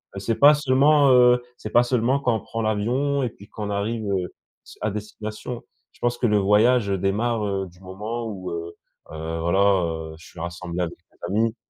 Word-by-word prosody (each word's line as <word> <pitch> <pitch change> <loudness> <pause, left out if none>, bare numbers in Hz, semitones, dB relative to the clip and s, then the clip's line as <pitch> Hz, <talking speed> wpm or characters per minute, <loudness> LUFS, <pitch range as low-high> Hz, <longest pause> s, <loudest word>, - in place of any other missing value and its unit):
Heu, - - -4
c'est 110 +3 -1
pas 145 +2 +7
seulement, 145 0 +4
heu, 125 -1 +6 0.2
c'est 110 - -7
pas 120 - +6
seulement 125 +2 +1
quand 120 -4 +1
on - - -1
prend 115 - -5
l'avion 125 +7 0
et 120 - 0
puis 100 -1 -16
qu'on 105 -1 -5
arrive, 110 +3 -2
heu, 95 -3 -2 0.3
s - - -14
à 105 -1 0
destination. 105 +3 -6 0.3
Je - - -24
pense 120 0 0
que 120 - +1
le 105 -1 +3
voyage, 105 +3 +3
heu, 100 - +1
démarre, 105 +4 0
heu, 95 -1 -2
du 90 +1 -19
moment 105 +5 -5
où, 95 -4 -6
heu, 85 0 -6 0.4
heu, 80 +1 -4
voilà, 85 +4 +1 0.3
heu, 80 -1 -5
je - - -15
suis 85 - -13
rassemblé 85 0 -4
avec 85 -1 -2 0.2
des - - -31 0.2
amis 115 +2 +1
105 Hz, 210 wpm, -23 LUFS, 95-120 Hz, 0.4 s, pas